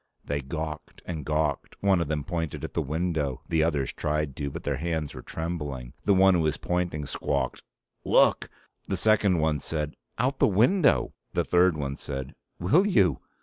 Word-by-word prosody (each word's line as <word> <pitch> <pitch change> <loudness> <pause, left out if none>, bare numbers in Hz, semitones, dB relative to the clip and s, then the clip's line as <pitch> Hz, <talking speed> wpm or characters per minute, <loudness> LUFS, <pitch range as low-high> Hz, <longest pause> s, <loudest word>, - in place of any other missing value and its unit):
They 70 0 -2
gawked 75 +2 -6
and 80 -4 -4
gawked. 75 0 -1
One 95 -3 +4
of 85 - -1
them 75 -1 -1
pointed 80 -1 -3
at - - -5
the - - 0
window. 75 -3 -1
The 80 -1 +2
others 75 -5 0
tried 75 -2 -1
to, 70 -1 -2
but 85 +4 -7
their 70 -2 -1
hands 80 -1 -2
were - - -8
trembling. 75 -7 -5
The 100 - +4
one 95 0 +6
who 90 - +3
was 80 -2 +1
pointing 90 -4 -2
squawked: 70 -1 -2 0.4
"Look!" - - +4 0.4
The 95 - -1
second 105 -2 +3
one 80 -2 +1
said, 75 +1 -3 0.2
"Out 130 +4 0
the - - +5
window!" 130 - +3 0.2
The - - +1
third 90 -2 +4
one 70 -2 -3
said, 65 -2 -5 0.3
"Will 155 - +4
you!" 95 - +3
80 Hz, 180 wpm, -27 LUFS, 75-90 Hz, 0.4 s, one